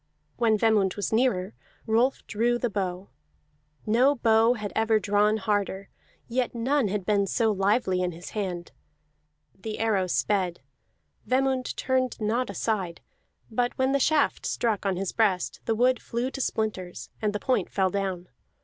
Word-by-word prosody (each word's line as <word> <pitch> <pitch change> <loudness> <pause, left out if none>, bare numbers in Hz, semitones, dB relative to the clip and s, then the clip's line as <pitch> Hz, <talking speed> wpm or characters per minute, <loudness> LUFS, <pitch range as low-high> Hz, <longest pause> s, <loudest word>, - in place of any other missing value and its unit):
When 225 -3 +3
Vemund 210 -4 +2
was 205 +1 -3
nearer, 220 -5 +1 0.3
Rolf 235 +4 +1
drew 235 +3 +1
the 240 -2 -2
bow; 190 -1 -3 0.8
no 250 +6 +4
bow 225 -1 +4
had 210 -3 -5
ever 220 0 +3
drawn 210 +2 +2
harder, 200 -1 -1 0.4
yet 245 0 -1
none 255 +1 +1
had 195 -1 -2
been 200 -1 +2
so 225 +2 +2
lively 195 -1 +1
in 180 -1 0
his 170 +1 -10
hand. 180 -5 -4 0.8
The 215 +2 -6
arrow 205 -5 +1
sped; 180 -1 0 0.7
Vemund 260 0 +1
turned 260 -1 0
not 225 +3 0
aside, 190 -3 -2 0.5
but 245 +2 -1
when 260 0 +2
the 280 - +2
shaft 295 +2 +2
struck 215 -4 -1
on 190 - +1
his 190 0 -2
breast 185 - 0
the 225 - +1
wood 250 +2 +2
flew 240 +3 -3
to 270 - -5
splinters, 185 - -3
and 210 -1 +1
the 205 - -3
point 210 -5 0
fell 190 -2 +1
down. 190 -2 -3
215 Hz, 155 wpm, -26 LUFS, 195-240 Hz, 0.8 s, no